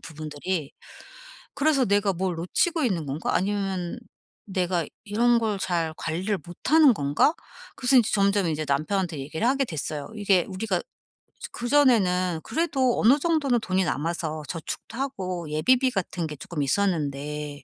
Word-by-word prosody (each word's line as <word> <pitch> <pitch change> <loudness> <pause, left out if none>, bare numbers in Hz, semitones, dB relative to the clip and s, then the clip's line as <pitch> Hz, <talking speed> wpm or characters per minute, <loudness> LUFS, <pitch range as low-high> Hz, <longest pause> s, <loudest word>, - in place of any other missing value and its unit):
부분들이. 155 +1 -5 0.8
그래서 280 -3 +2
'내가 200 -1 +2
뭘 185 0 -2
놓치고 300 - 0
있는 175 -10 -1
건가?' 140 +5 -2
아니면 190 -2 -1 0.5
'내가 180 -4 -1 0.2
이런 235 +3 +3
걸 220 -3 -1
잘 170 -4 -1
관리를 185 +6 -2
못하는 285 - +4
건가?' 145 - +2 0.4
그래서 255 +1 +2
인제 235 -4 +4
점점 200 -2 +2
인제 155 -1 -2
남편한테 160 +3 0
얘기를 160 - -3
하게 270 +1 +2
됐어요. 150 - -4
이게 200 -4 +2
우리가 190 -1 -1 0.4
저 - - -12
그전에는 215 - +2
그래도 270 -7 0
어느 250 +6 +6
정도는 290 -6 +1
돈이 190 -2 0
남아서 155 -1 -2
저축도 170 - -6
하고 185 - -4
예비비 255 - +3
같은 180 -4 -3
게 150 - -7
쪼끔 155 0 -5
있었는데 150 -3 -1
185 Hz, 325 characters per minute, -25 LUFS, 160-235 Hz, 0.8 s, 어느